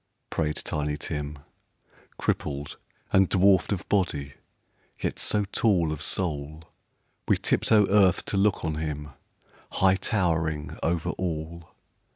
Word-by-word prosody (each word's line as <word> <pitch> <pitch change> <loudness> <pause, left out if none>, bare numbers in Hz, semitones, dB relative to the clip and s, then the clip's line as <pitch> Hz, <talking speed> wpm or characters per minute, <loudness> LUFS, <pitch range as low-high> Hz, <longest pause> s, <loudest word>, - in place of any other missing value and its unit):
" - - -50
prayed 75 -2 0
Tiny 75 0 -2
Tim, 75 -1 -4 0.8
Crippled, 70 0 -2 0.4
and 95 -1 +5
dwarfed 95 0 +4
of 100 - -2
body, 75 -8 0 0.7
yet - - -2
so 105 -1 +1
tall 90 -8 +2
Of 75 -1 -4
soul, 75 -3 -2 0.6
we - - +4
tiptoe 105 -2 +3
earth 95 -3 +4
to - - -3
look 100 -2 +2
on 80 -1 -1
him, 75 -1 -4 0.6
High 95 0 +4
towering 80 -8 -1
over 85 0 0
all. 85 -1 -4
80 Hz, 125 wpm, -27 LUFS, 75-95 Hz, 0.8 s, and